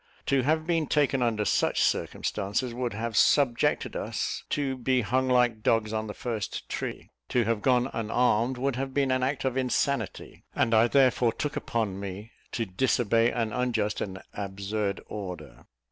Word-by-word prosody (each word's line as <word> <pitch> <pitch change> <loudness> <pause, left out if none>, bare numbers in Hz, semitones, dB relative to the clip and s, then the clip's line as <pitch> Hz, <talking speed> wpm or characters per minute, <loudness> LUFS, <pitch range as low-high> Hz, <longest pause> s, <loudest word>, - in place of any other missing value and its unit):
To 135 -1 +2
have 155 +4 +1
been 165 -3 +1
taken 140 -3 +2
under 110 -3 +1
such - - +2
circumstances, 105 +5 -1
would 120 -1 -2
have 115 +1 -3
subjected 130 -2 +3
us - - -3
to 135 -2 -1
be 130 0 +1
hung 130 +4 0
like 125 -3 +3
dogs 110 -1 +1
on 110 0 -2
the 105 - -6
first 115 -5 -4
tree; - - -5 0.2
to 125 - +2
have 115 -1 0
gone 125 0 +3
unarmed, 120 +2 +1
would 130 0 -1
have 135 0 -4
been 140 -2 +2
an 130 0 +1
act 135 +1 -1
of 130 0 0
insanity, 130 -2 -1
and 115 - +2
I 110 +1 +6
therefore 125 -3 +3
took 150 +2 -3
upon 105 -5 -2
me 100 +3 -7 0.2
to 115 - -1
disobey 115 +2 +2
an 115 -3 -2
unjust 115 -3 0
and 95 -1 -4
absurd 100 0 -3
order. 95 -4 -8
120 Hz, 165 wpm, -27 LUFS, 110-130 Hz, 0.2 s, I